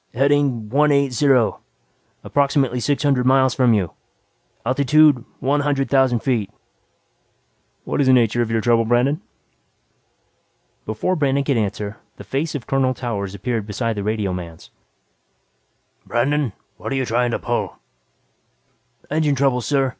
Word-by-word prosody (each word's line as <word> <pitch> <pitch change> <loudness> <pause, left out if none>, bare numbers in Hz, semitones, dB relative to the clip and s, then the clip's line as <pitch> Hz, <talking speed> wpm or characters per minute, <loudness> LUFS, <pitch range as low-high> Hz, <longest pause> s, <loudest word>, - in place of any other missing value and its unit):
"Heading 135 -4 +1
one 145 +5 +3
eight 140 -2 +2
zero. 130 -3 +2 0.6
Approximately 140 -3 +1
six 145 +5 -1
hundred 135 -3 +2
miles 130 -1 +4
from 125 -4 +3
you. 95 -6 -1 0.7
Altitude 140 +1 +4 0.2
one 140 +3 +1
hundred 140 -1 -1
thousand 130 -4 +3
feet." 115 -7 -1 1.3
"What - - -1
is 135 - +2
the 130 - +6
nature 120 -1 +3
of 115 - -1
your 115 0 0
trouble, 115 0 +3
Brandon?" 120 +6 +1 1.7
Before 110 +12 -1
Brandon 140 -3 +1
could 140 -1 0
answer, 105 0 -3 0.2
the - - -10
face 150 +4 -3
of 135 - -5
Colonel 130 -1 +1
Towers 100 -6 -4
appeared 110 +1 -3
beside 115 +2 -2
the 100 - -4
radioman's. 90 -6 -4 1.3
"Brandon, 130 0 0 0.2
what're 135 - -4
you 135 -1 0
trying 120 +1 0
to 115 - -1
pull?" - - -3 1.4
"Engine 155 -2 +1
trouble, 135 -2 +1
sir. 135 +1 +1
130 Hz, 135 wpm, -20 LUFS, 115-140 Hz, 1.7 s, the